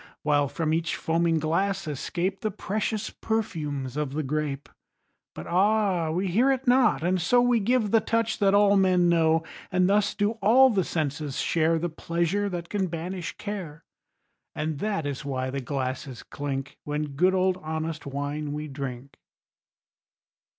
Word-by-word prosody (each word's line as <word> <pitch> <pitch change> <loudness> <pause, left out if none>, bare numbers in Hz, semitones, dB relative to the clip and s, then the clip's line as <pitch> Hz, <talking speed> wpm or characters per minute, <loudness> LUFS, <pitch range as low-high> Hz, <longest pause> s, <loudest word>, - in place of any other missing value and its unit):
While 145 -1 +2
from 155 +2 -1
each 165 +1 0
foaming 165 0 +1
glass 190 +5 0
escape 175 +6 -2
The 215 - 0
precious 215 +1 -3
perfumes 150 - -3
of 150 -2 -2
the 155 +1 -1
grape. 145 0 -2 0.7
But - - -7
ah, 190 -2 +2
we 180 +5 -1
hear 235 +10 +3
it 265 0 -1
not, 245 -8 +4
and 180 +1 +1
so 245 +8 +4
We 245 -1 +3
give 220 0 +1
the 225 - +6
touch 225 0 -1
that 200 -1 +4
all 205 0 +5
men 185 -2 +4
know. 165 -1 +3 0.3
And 180 0 +3
thus 200 +1 +2
do 210 +2 0
all 250 +6 +6
the 195 -4 +1
senses 150 -3 -3
share 165 0 +2
The 170 +2 -1
pleasure 170 +5 -1
that 175 -2 -5
can 195 -1 -1
banish 175 +1 -5
care. 180 -7 -6 0.7
And 155 -2 -2
that 200 -6 -1
is 145 0 -4
why 130 -2 -2
the 140 0 -3
glasses 130 -1 -4
clink 135 -1 -5
When 150 0 -3
good 180 +7 +2
old 185 0 +2
honest 160 -2 -4
wine 145 +2 -3
we 150 +1 -4
drink. 135 -1 -7
170 Hz, 160 wpm, -26 LUFS, 150-200 Hz, 0.7 s, the